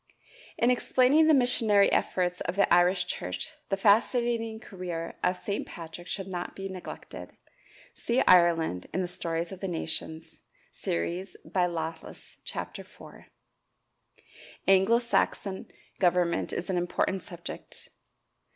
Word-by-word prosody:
In 240 +2 +4
explaining 260 +5 +4
the 315 - +6
missionary 225 -6 +4
efforts 180 -1 0
of 170 - -2
the 200 - +3
Irish 180 +1 +4
church, 90 - -4 0.2
the 195 - 0
fascinating 225 +2 +2
career 175 -5 -6
of 180 - +2
St. 200 +2 -3
Patrick 170 +1 -9
should 195 - -4
not 180 -2 -5
be 195 0 -5
neglected. 185 -2 -8 0.6
See 240 +2 0
"Ireland" 170 - +4
in 185 - +1
the - - -2
"Stories 170 -1 -3
of 190 - -8
the 195 - -3
Nations," 160 -1 -5 0.3
series, 175 - -3
by 180 -2 +1
Lawless, 160 -1 -6
Chapter - - -5
IV. - - -14 1.4
Anglo 195 +4 +5
Saxon 210 -4 -1 0.3
government 175 -2 +2
is 180 - -3
an 180 - 0
important 180 +2 0
subject. 175 -1 -8
185 Hz, 125 wpm, -28 LUFS, 170-205 Hz, 1.4 s, the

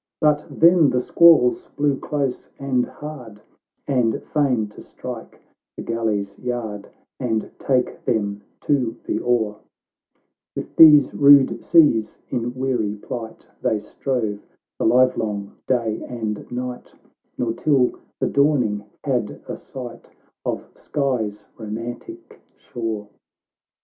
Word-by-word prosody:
But 150 -1 +2
then 170 -2 +5
the 125 - +1
squalls 155 -2 +5
blew 145 -2 +1
close 140 -4 -3
and 130 -3 0
hard, 130 -9 -9 0.5
And, 125 -5 +1
fain 130 -8 +2
to 105 - -13
strike 125 -3 -9 0.4
the - - -5
galley's 105 -4 -2
yard, 115 -5 -4 0.3
And 110 -4 -1
take 130 -2 0
them 100 -3 -1 0.2
to 125 -6 0
the - - -1
oar, 110 -4 0 1.0
"With - - -6
these 150 -3 +8
rude 140 -1 +6
seas, 145 -10 +4
in 120 +1 -2
weary 125 -6 -1
plight, 110 +2 -7
They 110 - +1
strove 110 0 -3 0.4
the - - 0
livelong 110 -5 +2
day 115 -4 0
and 110 -3 -5
night, 125 0 -6 0.4
Nor 115 -2 -1
till 135 -2 +2 0.3
the - - +1
dawning 130 -8 +2 0.2
had 125 -7 -1
a - - -4
sight 125 -3 -9 0.3
Of - - -3
Skye's 110 -8 -2
romantic 120 - -7
shore. 110 -3 -5
125 Hz, 115 wpm, -22 LUFS, 110-140 Hz, 1.0 s, these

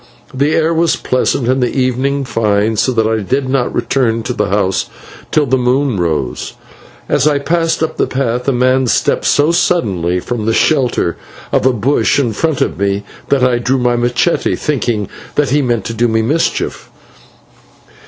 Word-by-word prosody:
The 140 +4 +1
air 160 +1 +2
was 165 0 +2
pleasant 130 -1 -1
and 130 +1 +1
the 125 - -1
evening 135 +2 0
fine, 110 -2 0
so 130 - +1
that 115 -3 +1
I 110 0 +1
did 130 +7 -1
not 130 -2 0
return 115 -4 0
to 125 - -3
the - - -1
house 95 -1 0 0.4
till 150 - +2
the 130 0 +1
moon 125 -2 +1
rose. 75 -8 -2 0.5
As 145 - +2
I 150 -1 +3
passed 165 +3 0
up 160 - -3
the - - +1
path 125 -1 -2
a - - +4
man 130 +1 +2
stepped - - +1
so 150 +3 +3
suddenly 95 - 0
from 110 +2 -4
the 115 - +2
shelter 125 - +1 0.3
of - - +2
a - - +4
bush 125 +5 +1
in 125 -6 0
front 160 +5 -1
of - - -1
me, 100 0 0 0.3
that 140 -2 +2
I 125 -1 +2
drew 125 +3 0
my 125 -1 +1
/machete/, 120 +7 0
thinking 120 -8 -1 0.3
that 145 -3 +1
he 145 +1 +3
meant 120 -6 -1
to 115 - -4
do 120 +2 +1
me 110 -1 +1
a - - -2
mischief. 150 +8 -1
125 Hz, 185 wpm, -15 LUFS, 110-140 Hz, 0.5 s, a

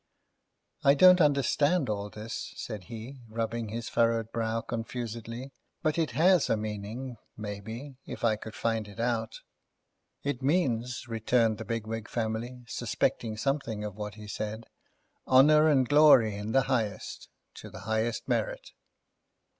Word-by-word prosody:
"I 140 +1 +6
don't 180 +3 +8
understand 145 +2 +3
all 105 -1 -2
this," 110 +2 -6
said 105 -5 -6
he, 120 +5 -8
rubbing 115 0 -3
his 115 +2 -4
furrowed 115 -1 +1
brow 115 0 -1
confusedly. 115 +2 -5 0.3
"But 155 +1 +1
it 160 - +1
has 180 0 +5
a - - +3
meaning, 110 +4 -5 0.2
maybe, 110 +6 -7
if - - -7
I 110 -2 +4
could 110 +1 -9
find 115 -2 -1
it 105 +2 -12
out." 115 -1 -1 0.8
"It 140 -2 -2
means," 125 -6 0
returned 115 -1 +1
the - - -5
Bigwig 115 -1 -4
family, 120 +2 -3
suspecting 110 -1 -1
something 115 -4 -1
of 105 -1 -4
what 105 -1 -6
he 105 -1 -10
said, 110 +2 -4 0.6
"honour 150 +4 +6
and 135 -4 +3
glory 145 -7 +6
in 105 +2 -4
the 135 +2 +4
highest, 115 -6 -2 0.3
to - - -9
the - - -10
highest 110 +1 -1
merit." - - -2
115 Hz, 140 wpm, -29 LUFS, 110-135 Hz, 0.8 s, don't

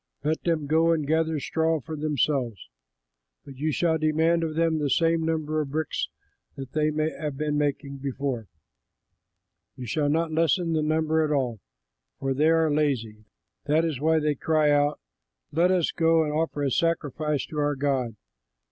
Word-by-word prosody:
Let 155 +2 0
them 165 -4 0
go 160 +3 +3
and 155 -3 -1
gather 160 +1 +1
straw 160 +2 0
for 155 +3 -7
themselves. 140 - -1 0.8
But 135 -2 -11
you 155 +3 -1
shall 160 +1 +1
demand 160 +2 +2
of 155 -1 -3
them 165 -1 +1
the 145 -1 0
same 165 +4 +2
number 155 -1 -1
of 145 - -4
bricks 155 +1 -2 0.5
that 135 -2 -8
they 155 0 +1 0.3
have 150 -3 -4
been 150 0 -1
making 145 -1 -1
before; 135 -4 -3 1.3
you 125 - -7
shall 145 +5 0
not 165 +2 +1
lessen 165 +1 +1
the 155 - +1
number 155 +1 +1
at 155 - -1
all, 125 -6 0 0.6
for 135 0 -1
they 150 +4 +3
are 160 -1 +3
lazy; 120 -8 -1 0.4
that 155 +3 +2
is 155 -6 -2
why 160 +2 +3
they 150 -1 +1
cry 155 +1 +2
out, 145 0 +2 0.5
'Let 170 +4 +3
us 180 -3 +2
go 165 0 +3
and 150 -1 -2
offer 155 -2 -1
a 135 - 0
sacrifice 150 -3 0
to 150 - -5
our 145 0 +1
God.' 130 -5 -1
155 Hz, 170 wpm, -26 LUFS, 140-160 Hz, 1.3 s, go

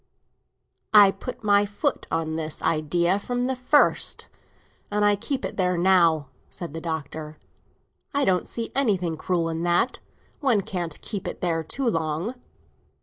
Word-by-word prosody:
"I 205 -2 +9
put 225 +5 -8
my 205 -1 +4
foot 205 0 -2
on 160 -1 -1
this 160 -1 -4
idea 170 +4 +1
from 245 +4 -2
the 260 +1 0
first, 255 +4 +2 0.6
and 210 0 +1
I 205 0 +4
keep 265 +6 -3
it - - -6
there 180 -2 +1
now," 170 -5 +3 0.2
said 170 -4 -7
the 165 - -5
Doctor. 155 -1 -5 0.7
"I 285 -1 +1
don't 180 -1 +1
see 230 -1 -5
anything 190 -11 +1
cruel 170 +1 -1
in 165 0 -3
that; 175 +8 +1 0.4
one 255 -8 +2
can't 175 -5 -4
keep 200 -4 -4
it - - -6
there 165 -2 0
too 260 - -3
long." 165 +3 -1
180 Hz, 150 wpm, -25 LUFS, 165-210 Hz, 0.7 s, I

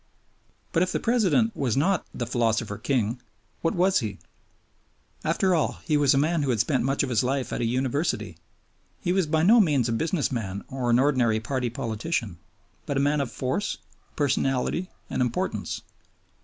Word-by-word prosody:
But 165 - +2
if 185 - +1
the - - 0
President 225 -1 +2
was 130 -4 0
not 180 +5 +1
the 120 - -4
philosopher 115 -3 0
king, 120 -1 0 0.4
what 165 - 0
was 185 +2 +3
he? 110 -6 -4 1.1
After 190 -1 +2
all 160 - +1
he 155 - +1
was 145 -2 +4
a - - +2
man 160 +3 +2
who 140 - -1
had 120 -3 +1
spent 130 +5 +1
much 135 +2 +1
of 135 - -2
his 115 -1 +2
life 130 +1 -1
at - - -2
a - - +1
University. 130 +6 -1 0.6
He 180 -4 0
was 190 -4 +1
by 160 +1 +2
no 225 +7 +7
means 145 - +3
a - - 0
business 160 +5 0
man 100 -5 -3
or 130 -2 -2
an 120 - +5
ordinary 125 -5 +3
party 125 +2 -2
politician, 115 - -3 0.5
but 140 - -1
a - - +3
man 145 +1 +2
of 135 - -3
force, 130 +11 -2 0.4
personality, 135 +4 0 0.2
and - - -2
importance. 125 -2 -2
135 Hz, 180 wpm, -26 LUFS, 120-160 Hz, 1.1 s, no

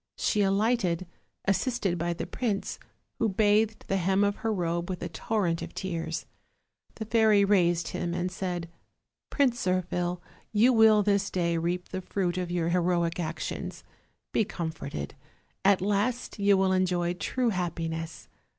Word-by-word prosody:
She 210 - +1
alighted, 195 -3 +1 0.4
assisted 195 -3 0
by 170 +1 0
the 170 - -4
prince, 205 0 -2 0.4
who 225 - +2
bathed 210 +2 +2
the 195 - +1
hem 190 +2 +2
of 205 0 +1
her 225 - -1
robe 170 -3 -1
with 180 -2 -4
a 175 - -3
torrent 175 -1 -1
of - - -7
tears. 165 -3 -3 0.7
The 220 - -5
fairy 220 -2 +4
raised 175 -4 +2
him 175 -1 -3
and 180 +1 -1
said: 180 -2 -3 0.6
"Prince 255 -5 +1
Zirphil, 180 -1 0 0.3
you 230 +4 +5
will 220 -2 +6
this 200 0 +2
day 170 -2 0
reap 175 +2 -2
the 185 - -4
fruit 180 -1 -1
of 180 -1 -3
your 175 -1 0
heroic 170 -1 +1
actions. 165 -1 -4 0.5
Be - - +3
comforted; 160 - -5 0.5
at 195 -1 +4
last 210 +4 -1
you 200 -1 +4
will 190 0 +3
enjoy 180 -2 +1
true 245 +7 -1
happiness. 165 -4 -3
185 Hz, 150 wpm, -28 LUFS, 175-205 Hz, 0.7 s, will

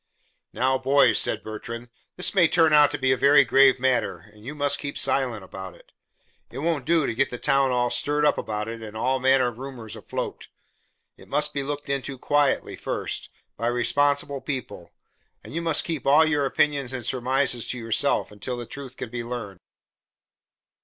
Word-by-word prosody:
"Now, 130 +1 +1
boys," 140 +2 +4
said - - 0
Bertrand, 115 +2 -7 0.3
"this 180 - +1
may 180 -4 +5
turn 160 -1 +3
out 150 -1 +7
to 145 - -3
be 130 -1 +1
a - - +4
very 140 +1 +5
grave 135 +1 +5
matter, 125 -9 0
and 105 0 -18
you 140 +6 -7
must 145 -1 0
keep 140 -1 -5
silent 125 -7 0
about 95 0 -9
it. - - -21 0.6
It 125 - -10
won't 150 -2 -1
do 165 -3 +3
to - - -1
get 135 +4 +1
the 125 - -6
town 135 0 +2
all 125 -1 0
stirred 150 +1 +1
up 150 - +4
about 105 0 -4
it 115 0 -7
and 110 -1 -8
all 130 +3 0
manner 130 -1 +3
of 120 0 -12
rumors 130 -5 -8
afloat. - - -6 0.7
It - - -16
must 150 0 +1
be 140 - -1
looked 145 +1 -5
into 140 -1 -3
quietly 145 +1 +1
first, - - -4 0.3
by 115 - -2
responsible 140 +4 +1
people, 130 -5 -6 0.5
and - - -11
you 165 - -2
must 165 -2 +2
keep 160 -6 -4
all 150 +3 +6
your 150 -3 +1
opinions 140 -2 0
and 125 -3 -5
surmises 125 -1 0
to 125 - -3
yourselves 115 -3 0
until 105 +5 -5
the 120 - -6
truth 130 +1 -10
can 115 - -6
be 120 -1 -4
learned." 115 -6 -6
130 Hz, 190 wpm, -24 LUFS, 120-145 Hz, 0.7 s, out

